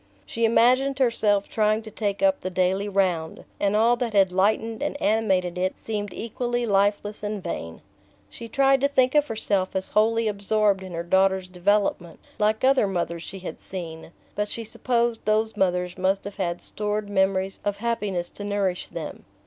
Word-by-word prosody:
She 230 0 -1
imagined 255 +4 +3
herself 215 -6 +2
trying 215 0 +1
to 220 - -10
take 205 +2 -2
up 285 -1 +4
the 185 - -4
daily 185 +2 0
round, 180 -5 -1
and 200 0 +1
all 230 +3 +4
that 235 -3 -2
had 195 -2 +4
lightened 220 +5 +1
and 290 0 -2
animated 190 -6 +1
it 185 +1 -1
seemed 205 -2 -4
equally 240 +3 -2
lifeless 205 0 +1
and 210 -2 -4
vain. 85 - -6 0.4
She 230 - -9
tried 270 +1 +3
to 280 - +4
think 260 -2 +2
of 295 -1 +3
herself 200 -5 -1
as 190 0 -3
wholly 225 +1 +2
absorbed 205 -1 +1
in 185 -1 -8
her 170 0 -3
daughter's 190 +1 +2
development, 180 -2 0 0.2
like 215 +2 +1
other 265 -5 +4
mothers 170 -3 -2
she 195 - -8
had 185 - -7
seen; 165 -3 -8 0.2
but 210 0 -1
she 230 - -5
supposed 235 0 -1
those 215 +1 +1
mothers 180 -2 0
must 190 +1 +1
have 200 0 -8
had 175 -3 -2
stored 210 0 -2
memories 190 -1 0
of 205 -1 -1
happiness 205 -6 -2
to 205 - -9
nourish 200 -3 -1
them. 160 -3 -7
205 Hz, 175 wpm, -25 LUFS, 190-225 Hz, 0.4 s, up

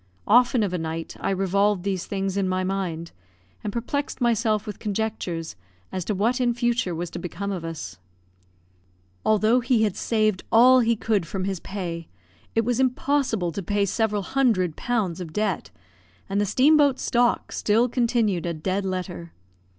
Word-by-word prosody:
Often 245 +1 +4
of 195 -3 -1
a 180 - -1
night 160 0 -4
I - - -1
revolved 195 0 +1
these 190 -3 -2
things 195 -1 -2
in 195 -2 0
my 185 0 0
mind, 180 -4 -3 0.5
and 205 - -2
perplexed 260 +6 -3
myself 225 -3 +1
with 210 - -7
conjectures 205 -6 -3 0.4
as 185 - -3
to 210 - -1
what 235 +6 +1
in 240 -1 +2
future 240 -7 0
was 170 +1 -4
to - - -5
become 200 +3 -4
of 180 -4 -4
us. 165 - -6 1.2
Although 215 +3 +3
he 245 -2 +2
had 210 -4 0
saved 215 -4 +1
all 255 +3 +7
he 235 -1 +3
could 210 -5 0
from 190 -2 -3
his 190 -2 -2
pay, 170 -4 -5 0.5
it 225 -1 +2
was 245 0 0
impossible 255 -7 +1
to 180 - -4
pay 205 +2 0
several 210 0 0
hundreds 220 -7 +2
of - - -23
pounds 195 -8 -1
of 165 -3 -7
debt; 210 -2 -1 0.6
and 200 +1 0
the 205 - 0
steam 270 +10 +5
boat 285 -3 +4
stock 240 -1 +1
still 225 +4 +2
continued 230 -7 +1
a 170 - -2
dead 185 +5 -1
letter. 180 -3 -4
205 Hz, 175 wpm, -24 LUFS, 185-235 Hz, 1.2 s, all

